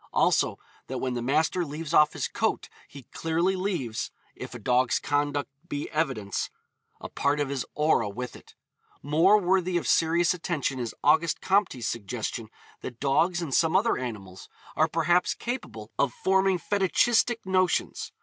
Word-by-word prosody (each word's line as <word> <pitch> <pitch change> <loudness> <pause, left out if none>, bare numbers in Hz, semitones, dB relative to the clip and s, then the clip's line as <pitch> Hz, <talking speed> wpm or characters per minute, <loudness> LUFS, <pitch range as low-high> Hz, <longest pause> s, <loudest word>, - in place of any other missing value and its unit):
Also, - - +2 0.3
that - - -4
when 130 -1 -2
the 120 - -3
master 155 +8 +1
leaves 155 0 -6
off 150 0 +5
his - - -2
coat - - -1 0.2
he 140 -2 -12
clearly 170 +4 0
leaves 175 - -2 0.2
if - - -9
a - - -4
dog's 125 0 +2
conduct 145 -1 -1 0.2
be 145 -2 -4
evidence 135 - -1 0.5
a - - -7
part 145 +1 0
of 145 -2 -1
his 140 -2 -3
aura 150 -8 +2
with 125 +5 -6
it. - - -16 0.5
More 165 +9 +5
worthy 185 -1 +1
of 170 - -3
serious 165 +1 +3
attention 155 -7 -2
is 120 -2 -4
August 160 +2 +3
Comte's 190 - +1
suggestion 115 0 -4 0.3
that 120 -2 -8
dogs 170 +6 +2
and 145 -5 -4
some 160 +4 +3
other 220 +4 +3
animals 100 -7 -7 0.3
are - - +3
perhaps 175 +2 +2
capable 175 - -6
of 140 - +2
forming 190 0 +2
fetichistic 215 +5 +1
notions. 185 -1 0
155 Hz, 155 wpm, -27 LUFS, 130-180 Hz, 0.5 s, off